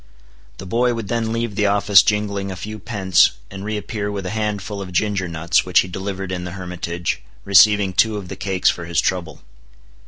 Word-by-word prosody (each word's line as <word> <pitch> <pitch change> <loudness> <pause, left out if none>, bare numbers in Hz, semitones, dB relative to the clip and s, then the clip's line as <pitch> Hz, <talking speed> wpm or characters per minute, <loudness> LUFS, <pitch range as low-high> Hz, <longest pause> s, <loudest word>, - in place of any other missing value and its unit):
The - - -8
boy 120 +5 +1
would 110 -4 -5
then 115 -1 -1
leave 115 -1 -2
the 105 +1 +1
office 100 -1 +5
jingling 100 -2 -1
a 95 - -5
few 110 +4 -7
pence, 95 - +3 0.2
and 95 0 -7
reappear 105 0 -3
with 100 -2 -5
a 90 - -3
handful 105 -2 -3
of 95 -1 -7
ginger 95 0 0
nuts 85 0 +1
which 90 - +4
he - - -5
delivered 95 +1 -5
in 90 -1 -3
the 90 -1 -6
hermitage, 90 -2 -4 0.2
receiving 100 0 +5
two 105 +3 +2
of 100 -3 -7
the - - -7
cakes 95 -2 +1
for 85 - -7
his 85 -1 0
trouble. 90 -2 -2
100 Hz, 195 wpm, -20 LUFS, 90-105 Hz, 0.2 s, office